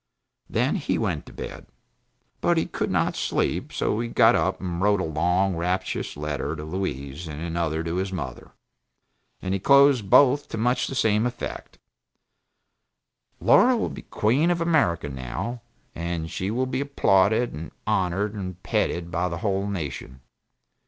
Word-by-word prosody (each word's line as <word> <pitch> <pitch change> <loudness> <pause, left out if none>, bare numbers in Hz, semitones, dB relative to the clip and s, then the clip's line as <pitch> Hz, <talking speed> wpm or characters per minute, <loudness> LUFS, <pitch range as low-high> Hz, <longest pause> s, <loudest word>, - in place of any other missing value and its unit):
Then - - +1
he - - -1
went - - -2
to - - -11
bed. - - -8 0.7
But - - +2
he - - +2
could - - -3
not - - +1
sleep; - - -1
so 105 - -1
he 120 - -1
got 115 0 +5
up 95 -4 +1
and 90 -1 -4
wrote 100 0 +3
a - - 0
long, 90 +4 +1
rapturous 90 0 -2
letter 75 +1 -3
to 75 - -7
Louise, 75 -3 -4
and 75 -1 -6
another 80 -1 -2
to 85 +1 -2
his 95 +1 -2
mother. 65 -10 -6 0.9
And 95 0 -1
he 100 - 0
closed 140 -2 +5
both 140 +4 +5
to - - -4
much 125 +3 +1
the 135 - -5
same 110 -2 +2
effect: 120 0 -6 1.6
"Laura 250 0 +5
will 225 - -1
be - - -8
queen 130 +11 +1
of 175 0 +1
America, 150 - +2
now, 70 - -5 0.3
and 85 -1 -4
she 95 +3 -2
will 125 +4 0
be 130 +1 -2
applauded, 110 -4 +2
and 80 +3 -6 0.2
honored 95 +3 0
and 95 -3 -6
petted 85 0 -1
by 90 +1 0
the 85 - -4
whole 100 0 0
nation. 70 -8 -5
95 Hz, 160 wpm, -25 LUFS, 85-115 Hz, 1.6 s, got